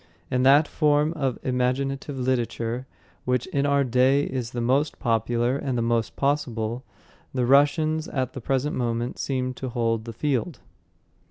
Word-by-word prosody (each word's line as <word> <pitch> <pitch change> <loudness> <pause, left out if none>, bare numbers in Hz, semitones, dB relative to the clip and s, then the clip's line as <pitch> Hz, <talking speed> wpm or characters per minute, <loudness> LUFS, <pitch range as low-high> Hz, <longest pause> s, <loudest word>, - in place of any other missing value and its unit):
In 125 - +1
that 140 +4 +6
form 150 0 +2
of 135 -6 -1
imaginative 135 +2 -1
literature, 125 -1 -2 0.4
which 125 -1 0
in 140 0 0
our 140 0 +3
day 130 +3 +3
is 125 -4 -3
the 120 - -5
most 135 +6 +1
popular 120 +2 0
and 130 -3 -2
the 115 - 0
most 115 -1 0
possible, 125 -5 -1 0.5
the 125 -2 +1
Russians 155 +4 +3
at 130 -2 -2
the 130 - -7
present 135 +4 -1
moment 120 -1 -2
seem 130 -2 -2
to 130 - -7
me - - -3
to - - -11
hold 115 -1 0
the 115 - -6
field." 140 +3 -1
130 Hz, 165 wpm, -25 LUFS, 120-140 Hz, 0.5 s, that